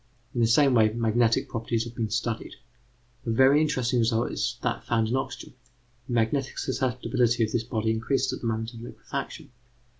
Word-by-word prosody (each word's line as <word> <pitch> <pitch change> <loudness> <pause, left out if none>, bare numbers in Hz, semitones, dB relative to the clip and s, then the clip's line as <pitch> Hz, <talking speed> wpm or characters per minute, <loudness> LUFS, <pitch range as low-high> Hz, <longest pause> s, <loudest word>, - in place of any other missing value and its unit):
In 120 - 0
the 115 - +4
same 135 +4 +4
way, 110 -2 +5
magnetic 115 0 +1
properties 115 0 -2
have 120 0 -8
been 115 -2 -2
studied. 115 +1 -3 0.7
A 120 - -4
very 135 +6 +5
interesting 130 -5 +1
result 115 0 +1
is - - -2
that - - -1
found 115 -2 0
in 125 - 0
oxygen: 130 -2 -4 0.5
the 120 - -4
magnetic 120 +4 0
susceptibility 125 -2 0
of 110 - -1
this 120 - +1
body 110 -1 -1
increases 120 +4 0
at - - -6
the 115 - -2
moment 115 +1 -2
of 115 - -10
liquefaction. 120 - -7
120 Hz, 180 wpm, -26 LUFS, 115-125 Hz, 0.7 s, way